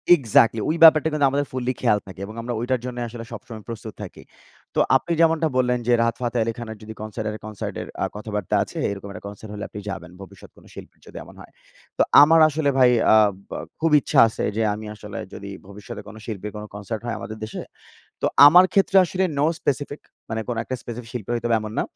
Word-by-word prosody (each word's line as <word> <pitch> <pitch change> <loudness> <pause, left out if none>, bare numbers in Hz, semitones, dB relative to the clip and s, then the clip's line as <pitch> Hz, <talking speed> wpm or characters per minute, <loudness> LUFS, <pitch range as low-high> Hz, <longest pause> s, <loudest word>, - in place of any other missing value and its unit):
Exactly! 115 -5 +3
ওই 155 - +1
ব্যাপারটা 160 -1 +8
কিন্তু 150 -2 +2
আমাদের 145 +1 0
ফুল্লি 130 0 -2
খেয়াল 110 -4 +3
থাকে 95 - -11
এবং 110 +2 -10
আমরা 120 +1 -4
ওইটার 125 +2 -1
জন্য 125 -1 -6
আসলে 115 0 -8
সবসময় 115 -1 -9
প্রস্তুত 110 -2 -7
থাকি। - - -10 0.5
তো - - +2 0.2
আপনি 135 +6 0
যেমনটা 165 -1 +3
বললেন 125 -1 +2
যে, - - +3
রাহাত 115 0 +1
ফাতে 120 0 -2
আলী 115 +1 -2
খানের 110 -2 -7
যদি 110 +1 -8
কনসার্টের, 110 0 -4
কনসার্টের 105 -2 -6
এ্যা - - -1
কথাবার্তা 105 -3 -3
আছে, - - -11
এরকম 100 0 -7
একটা 95 - -10
কনসার্ট 105 +1 -10
হলে 105 - -6
আপনি 105 - -8
যাবেন, 90 -3 -7
ভবিষ্যতে 95 0 -14
কোনো - - -18
শিল্পীর - - -12
যদি - - -11
এমন - - -15
হয়। - - -14 0.5
তো - - +2 0.2
আমার 160 +2 +5
আসলে 150 -1 0
ভাই, 125 -2 +6 0.2
আ - - +7 0.3
বা - - -5 0.2
খুব 165 0 +1
ইচ্ছা - - +1
আছে 110 - -5
যে, - - +1
আমি 105 +1 -7
আসলে 105 +1 -9 0.2
যদি 100 0 -8 0.2
ভবিষ্যতে 100 +1 -9
কোনো 110 +1 -11
শিল্পীর, 105 -2 -6
কোন 105 0 -6
কনসার্ট 105 +2 -5
হয় 115 - -2
আমাদের 110 0 -7
দেশে, 110 - -6 0.6
তো - - +2 0.2
আমার 175 +5 +8
ক্ষেত্রে 195 0 +2
আসলে 185 +2 -1
নো 145 - +2 0.2
স্পেসিফিক, 145 +1 -2 0.3
মানে 110 0 -2
কোন 120 - -2
একটা 130 - -4
স্পেসিফিক 120 0 -8
শিল্পী 120 -3 -5
হইতে 120 0 -2
হবে 115 -1 +3
এমন 110 0 -6
না। - - +2
115 Hz, 215 wpm, -23 LUFS, 105-130 Hz, 0.6 s, ব্যাপারটা